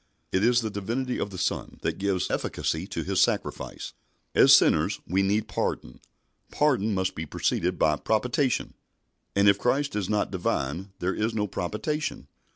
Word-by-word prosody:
It 95 - +1
is 120 +1 +4
the 110 -2 -3
Divinity 120 +6 -2
of - - -2
the 95 - -8
Son 90 - -2
that - - -2
gives 95 -2 0
efficacy - - -2
to - - -4
His - - +1
sacrifice. - - -1 0.4
As - - +6
sinners - - +5
we 95 +3 +1
need 105 +2 +1
pardon. 60 - -3 0.5
Pardon 120 -8 +2
must 95 0 0
be 80 0 -5
preceded 90 +4 -1
by 75 -1 +3
propitiation, 125 - 0 0.6
and 100 +1 +4
if 100 - +5
Christ 140 +2 0
is 100 -3 -2
not 105 -1 0
Divine 90 0 -2
there 90 +2 -1
is 110 +1 -1
no 105 -1 +1
propitiation. 105 - -3
100 Hz, 165 wpm, -26 LUFS, 95-120 Hz, 0.6 s, As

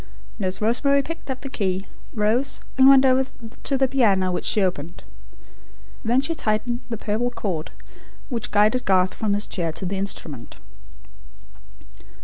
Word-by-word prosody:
Nurse 185 -2 -1
Rosemary 275 +6 +2
picked 330 0 -8
up 260 -1 -4
the 280 - -6
key, 190 -5 -1 0.3
rose, 230 +6 0
and 265 0 +6
went 270 -1 +7
over 260 0 +3 0.3
to 275 - 0
the 265 0 +3
piano, 200 -8 +2
which 180 - -3
she - - +3
opened. 175 -2 -3 1.0
Then 240 +4 +2
she 330 +4 -1
tightened 235 -3 -1
the 230 - -3
purple 220 +4 -1
cord, 185 -9 -4 0.6
which 235 -5 -4
guided 215 +4 +2
Garth 185 -1 +3
from 210 -2 -1
his 205 - -2
chair 170 -4 -2
to 185 - -4
the 190 +1 -2
instrument. 160 -9 -1
215 Hz, 150 wpm, -23 LUFS, 190-260 Hz, 1.0 s, went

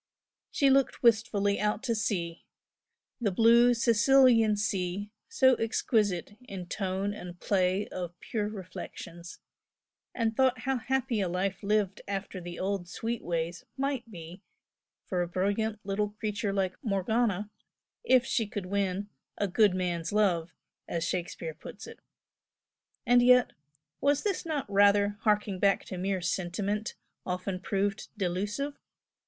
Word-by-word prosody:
She 275 -2 +3
looked 270 -1 +2
wistfully 210 -3 +3
out 210 +2 0
to 240 -3 0
sea, 180 -6 -2 0.8
the 230 -4 +1
blue 235 +4 +5
Sicilian 230 -1 +5
sea 200 0 -2 0.2
so 260 - +5
exquisite 215 - 0
in 190 -5 -7
tone 195 +2 -2
and 180 -4 -9
play 190 0 +1
of 175 -1 -6
pure 210 -2 -2
reflections, 175 -3 -8 0.8
and 225 -2 0
thought 255 -2 +2
how 265 +2 0
happy 260 -2 -1
a 185 - 0
life 185 +2 -2
lived 205 -1 0
after 195 -1 -4
the 175 0 -7
old 190 -2 -2
sweet 230 +5 -4
ways 170 0 -2
might 270 -3 -2
be 175 -1 -10 0.6
for 180 -2 -1
a 175 - -1
brilliant 205 +5 -1
little 205 +1 -1
creature 210 0 -3
like 190 -2 -1
Morgana, 210 0 0 0.5
if 260 - +4
she 230 -4 0
could 205 -3 -5
win 195 +1 -1 0.3
"a 205 - 0
good 200 0 +3
man's 175 -3 -2
love" 180 -6 +2 0.4
as 165 -1 -2
Shakespeare 170 -2 -3
puts - - -10
it. - - -11 1.1
And 245 0 +5
yet 250 0 +5 0.5
was 285 +3 +1 0.2
not 295 -4 -1
this - - -11
rather 205 +1 +4
harking 210 -3 +1
back 200 0 +2
to 185 - -6
mere 190 0 -1
sentiment, 195 +4 -2 0.3
often 185 +1 -3
proved 200 +1 -1
delusive? 205 +10 -2
205 Hz, 135 wpm, -29 LUFS, 185-225 Hz, 1.1 s, blue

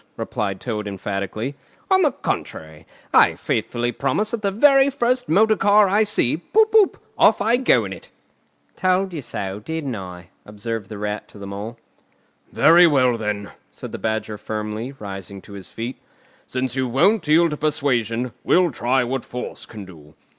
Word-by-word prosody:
replied 100 -3 -3
Toad 105 -4 -4
emphatically. 100 +5 -4 0.4
"On 380 0 +5
the 300 -5 +3
contrary, 80 - -5 0.3
I - - +6
faithfully 120 0 -2
promise 140 - -1
that 235 - -3
the 200 - +1
very 275 +6 +5
first 250 -2 0
motor 215 +6 +4
car 205 0 +4
I 205 +3 +3
see, 210 - +1
poop 435 - +2
poop! 435 -3 +4 0.2
off 220 - +5
I 225 +4 +2
go 130 - +3
in 95 - -5
it!" 95 - -13 0.7
"Told 185 0 +1
you 155 - -4
so, 100 -5 -5
didn't 145 +1 -4
I?" 90 -3 -9
observed 105 0 -6
the 105 - -7
Rat 105 +1 -4
to - - -16
the 100 - -8
Mole. 105 +4 -6 0.7
"Very 170 +2 +6
well, 130 -5 +3
then," 105 -2 -4 0.2
said - - -9
the - - -6
Badger 110 -1 -3
firmly, 110 +3 -4
rising 100 -2 -8
to 100 - -13
his 100 -2 -9
feet. 120 +3 -6 0.5
"Since 130 0 -3
you 130 -1 0
won't 175 - +2
yield 165 +2 +4
to 150 - -3
persuasion, 125 -6 0
we'll 180 -2 +3
try 125 +1 +1
what 125 +1 -3
force 125 - -7
can 105 -3 -9
do. 75 -5 -15
125 Hz, 170 wpm, -22 LUFS, -, 0.7 s, I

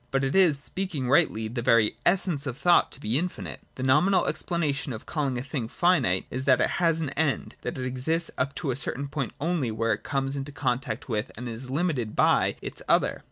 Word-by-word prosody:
But 135 +1 0
it 135 +4 0
is, 180 -7 +5
speaking 160 -1 -4
rightljr, 120 -5 +2
the 120 - -2
very 115 -3 +3
essence 175 -6 +1
of 130 -1 -4
thought 175 +3 +4
to - - -10
be 120 +1 0
infinite. 100 - -5 0.2
The 130 - -5
nominal 150 +9 +4
explanation 150 -6 -1
of 110 - -8
calling 140 -5 -1
a 120 - -3
thing 135 -5 -3
finite 135 - +2
is 130 +1 -3
that 130 -2 +5
it - - +2
has 165 -1 +3
an 150 -4 -2
end, 150 -1 -1
that - - -4
it 130 - -3
exists 150 +7 -1
up 135 +2 -2
to 140 -2 -2
a - - -2
certain 135 +1 -2
point 140 -3 -3
only, 155 -4 0
where 115 +1 0
it - - -5
comes 135 0 -2
into 140 +1 -4
contact 130 -2 -2
with, 110 -4 -2
and 120 +2 -5
is 120 +2 -6
limited 140 -7 -1
by, - - +3
its - - -5
other. - - +3
135 Hz, 215 wpm, -26 LUFS, 125-160 Hz, 0.2 s, is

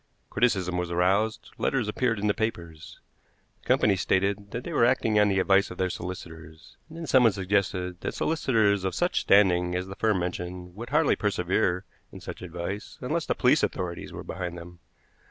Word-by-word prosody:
Criticism 95 -7 +1
was 90 -1 -3
aroused; 95 +5 0
letters 125 -5 0
appeared 115 +1 0
in 100 - -3
the 105 - +3
papers. 85 -8 -5 0.6
The - - -20
company 100 - +3
stated 100 +2 0
that 120 +4 -5
they - - -6
were - - +3
acting 115 -3 +3
on 105 0 +4
the 95 - +1
advice 100 +2 +3
of 90 - -9
their 95 -1 0
solicitors, 80 -3 -9
and 160 - -11
then 165 - -5
someone 125 -7 +5
suggested 95 -2 -1
that - - -4
solicitors 110 - +1
of 95 - -2
such 175 +1 +1
standing 90 -3 +4
as 90 0 -2
the 95 0 -8
firm 110 -2 +1
mentioned 90 0 -5
would 115 +6 -8
hardly 150 +2 +3
persevere 90 -2 0 0.3
in - - -10
such - - -8
advice 90 +3 -6
unless - - -2
the - - 0
police - - +3
authorities 85 -2 -3
were - - -7
behind 90 -2 -5
them. 85 0 -11
95 Hz, 185 wpm, -27 LUFS, 90-110 Hz, 0.6 s, someone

